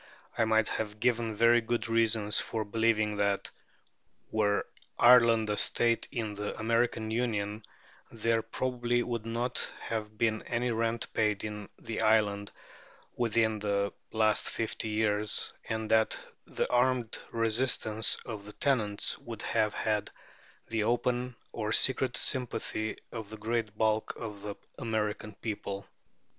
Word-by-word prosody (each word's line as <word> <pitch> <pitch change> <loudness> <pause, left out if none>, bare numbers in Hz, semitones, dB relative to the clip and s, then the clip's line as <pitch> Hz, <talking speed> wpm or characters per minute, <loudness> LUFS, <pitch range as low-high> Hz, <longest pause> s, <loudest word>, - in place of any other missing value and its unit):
I 115 - +2
might 110 0 +3
have 105 -1 -3
given 120 -2 +1
very 115 +2 +5
good 115 +1 -1
reasons 115 -2 +3
for 110 -2 -2
believing 110 -1 +1
that, 100 -1 0 0.8
were 105 -2 +1 0.3
Ireland 115 -3 +6
a 105 - -1
state 115 -1 +3
in 110 -3 -3
the 105 0 -4
American 115 0 0
Union, 110 -3 -1 0.5
there 115 0 +1
probably 120 +1 -1
would 115 -2 -4
not 120 +2 0
have 110 -1 -4
been 110 -1 +1
any 120 0 0
rent 115 0 -1
paid 105 -2 +1
in 105 -1 -5
the 115 - -3
island 105 -2 +2 0.6
within 115 -2 +1
the 100 -1 0 0.2
last 110 -1 +3
fifty 115 0 -3
years, 105 -1 +1 0.2
and 110 -1 -2
that 110 -1 +3 0.3
the - - -2
armed 125 -2 +2
resistance 115 -1 +2
of 105 -4 -6
the 105 - -9
tenants 110 -8 0
would 115 -2 -8
have 110 -2 +1
had 105 -1 0 0.6
the 115 -1 -1
open 125 +2 0 0.2
or 105 -2 -3
secret 130 0 +2
sympathy 120 -4 -1
of 110 -3 -6
the 110 - -8
great 110 -1 -2
bulk 110 0 +1
of 105 -3 -7
the 100 0 -5 0.2
American 105 -3 -2
people. 100 -3 -5
110 Hz, 135 wpm, -30 LUFS, 105-115 Hz, 0.8 s, Ireland